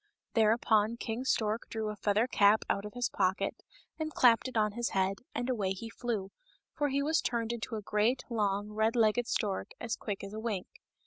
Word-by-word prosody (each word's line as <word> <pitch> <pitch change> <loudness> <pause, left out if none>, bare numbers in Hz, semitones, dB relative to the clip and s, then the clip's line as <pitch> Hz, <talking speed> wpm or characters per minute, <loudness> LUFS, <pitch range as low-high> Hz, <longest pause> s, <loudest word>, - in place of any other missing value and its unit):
Thereupon 220 0 +3
King 235 +2 -4
Stork 220 -3 0
drew 220 -1 -2
a 210 - -4
feather 210 +2 +2
cap 210 -3 +4
out 200 - -1
of 210 - -8
his 245 0 +1
pocket 190 0 0 0.4
and 310 0 -2
clapped 245 -3 +4
it 255 - -4
on 210 -1 +3
his 240 +3 -2
head, 190 0 0 0.2
and 245 - -1
away 205 -7 0
he 225 +4 -8
flew, 220 -6 -3 0.4
for 290 -1 0
he 280 +1 +1
was 315 +2 +2
turned 235 -1 -1
into 230 -1 -4
a 215 - -5
great, 215 +6 +1
long, 205 -3 -1
red 220 +2 +1
legged 230 +1 +3
stork 205 -6 -1
as 230 -2 -2
quick 205 -3 -5
as 200 +1 -7
a 215 - -4
wink. 215 -5 -2
220 Hz, 200 wpm, -31 LUFS, 205-240 Hz, 0.4 s, cap